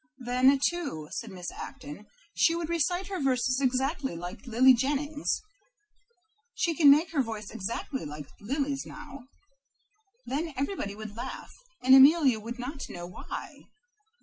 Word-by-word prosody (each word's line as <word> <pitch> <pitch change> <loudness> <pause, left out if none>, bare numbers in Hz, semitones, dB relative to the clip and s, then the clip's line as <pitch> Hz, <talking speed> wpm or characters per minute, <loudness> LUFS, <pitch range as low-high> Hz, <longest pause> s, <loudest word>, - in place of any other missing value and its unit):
"Then, 255 +2 +3
too," 280 - -5
said 225 +2 -5
Miss 180 -3 -7
Acton, 275 +2 -9 0.3
"she 330 - +3
would 335 -1 -3
recite 350 +3 0
her 380 0 -4
verses 255 -1 +1
exactly 265 - 0
like 180 +9 -8
Lily 255 +3 +6
Jennings. 290 +4 -1 1.2
She 335 - +1
can 305 -3 +6
make 305 +5 +5
her 300 -4 +2
voice 220 -4 -5
exactly 230 +6 -4
like 150 0 -7
Lily's 275 +5 -2
now. 290 -4 -11 1.0
Then 305 +4 -3
everybody 270 - -3
would 215 -1 -8
laugh, 235 - -7 0.3
and 260 +1 +6
Amelia 270 -3 +7
would 230 +3 -7
not 270 +3 -6
know 175 0 -7
why. 175 0 -8
265 Hz, 140 wpm, -28 LUFS, 230-295 Hz, 1.2 s, Amelia